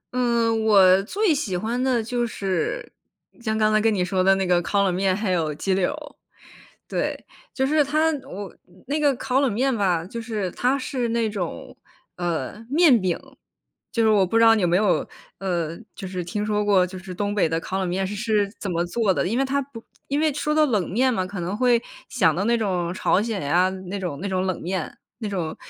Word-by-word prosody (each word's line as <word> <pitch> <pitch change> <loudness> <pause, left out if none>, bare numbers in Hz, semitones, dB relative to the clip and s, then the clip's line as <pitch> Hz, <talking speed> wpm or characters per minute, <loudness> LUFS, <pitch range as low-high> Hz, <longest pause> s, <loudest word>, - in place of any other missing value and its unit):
嗯， 235 -2 +1
我 195 -3 +6
最 390 - +1
喜 230 - -2
欢 230 +6 -2
的 250 -3 +1
就 240 +1 -1
是 225 - -3 0.5
像 220 -2 -1
刚 215 0 +2
才 215 - +4
跟 225 - +3
你 185 -3 0
说 185 0 0
的 195 +1 +5
那 190 0 -1
个 180 -1 +3
烤 200 +3 +1
冷 190 -2 +1
面， 190 +1 +1
还 210 -3 -1
有 160 -4 0
鸡 190 +5 -1
柳 185 -1 +1
儿。 300 0 -9 0.7
对， - - -2 0.3
就 265 - 0
是 295 +2 +3
它 310 +3 +2 0.2
我 200 0 -7 0.4
那 290 +2 0
个 290 -2 +3
烤 255 +1 -1
冷 270 -4 +2
面 260 +5 +1
吧， 185 -6 +1
就 230 +6 -6
是 215 -5 -3
它 250 +8 +1
是 255 -3 -2
那 230 -1 0
种， 190 -5 -5 0.4
呃， 175 +5 -3
面 285 -4 +5
饼。 185 -3 0 0.8
就 230 - +1
是 220 - +4
我 205 -3 +4
不 205 - -1
知 230 - +5
道 225 0 +7
你 210 - 0
有 - - +3
没 175 +1 +2
有， 205 -1 +2 0.3
呃， 170 -4 -2 0.2
就 190 - -7
是 180 -1 -4
听 205 +5 -3
说 210 0 0
过 200 -3 +4
就 185 +1 -7
是 185 0 -8
东 205 +2 -2
北 195 - +3
的 165 +1 -1
烤 190 +3 -4
冷 190 - -1
面 190 +2 -1
是 205 - -5
是 210 -2 0
怎 200 - -5
么 170 0 0
做 195 +2 +1
的， 175 - 0
因 230 +6 0
为 270 - +2
它 280 +1 0
不 250 -4 -12 0.2
因 280 - 0
为 310 0 +2
说 300 +2 -1
到 310 0 +4
冷 210 - 0
面 255 +6 +2
嘛， 185 - 0
可 195 0 -7
能 180 +4 -3
会 245 -1 +3 0.3
想 165 -10 +2
到 190 - -1
那 235 0 +3
种 180 -5 -1
朝 190 +1 +2
鲜 220 -4 -2
呀 175 +6 +3 0.2
那 200 - -4
种 175 -7 -4
那 200 - -3
种 185 -1 -1
冷 185 -2 -2
面。 180 -2 -4 0.2
那 220 -3 -4
种 175 -6 -3
205 Hz, 245 characters per minute, -23 LUFS, 185-240 Hz, 0.8 s, 道